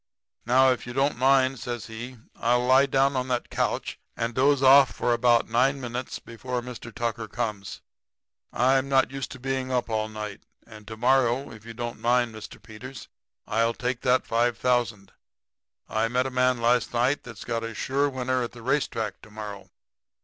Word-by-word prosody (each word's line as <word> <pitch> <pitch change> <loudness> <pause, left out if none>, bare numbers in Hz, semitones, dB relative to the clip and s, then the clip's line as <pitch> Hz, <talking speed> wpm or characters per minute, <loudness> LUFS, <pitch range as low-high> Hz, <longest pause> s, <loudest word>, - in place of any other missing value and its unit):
Now 130 +2 +5
if 125 -1 -3
you 120 - -6
don't 135 +3 +1
mind,' 130 -1 +3
says 120 -3 -5
he, 120 +3 -8 0.2
'I'll 120 +1 +2
lie 130 +2 +5
down 135 +1 +2
on 130 0 -1
that 125 -1 -2
couch - - -2 0.2
and 115 +1 -2
doze 135 +2 +3
off 135 0 +7
for 120 - 0
about 120 0 +3
nine 130 +5 +2
minutes 125 0 -5
before 125 +2 -5
Mr. 120 -1 -8
Tucker 115 -1 -3
comes. 105 -4 -4 0.7
I'm 130 +2 +2
not 135 -1 +3
used 135 -2 -5
to 130 - -11
being 130 0 -2
up 125 -2 -1
all 110 0 -1
night. 105 -2 -7 0.2
And 110 -2 -14
to 110 0 -7
morrow, 130 +2 +2
if 110 0 -13
you 115 - -8
don't 120 -1 -5
mind, 120 0 +2
Mr. 110 -1 -10
Peters, 125 +4 -10 0.4
I'll 115 +2 +1
take 125 -1 -3
that 130 -1 +2
five 120 0 +1
thousand. 115 -6 0 0.8
I 110 +1 0
met 125 +2 0
a 135 - -3
man 125 -1 +2
last 120 +1 +1
night 125 +4 +2
that's 115 -4 -10
got 115 -1 -2
a 115 -1 -5
sure 140 +5 0
winner 130 -1 -1
at 120 - -4
the 120 -2 -12
racetrack 115 -6 -1
to - - -15
morrow. 105 -2 -8
120 Hz, 185 wpm, -26 LUFS, 115-130 Hz, 0.8 s, off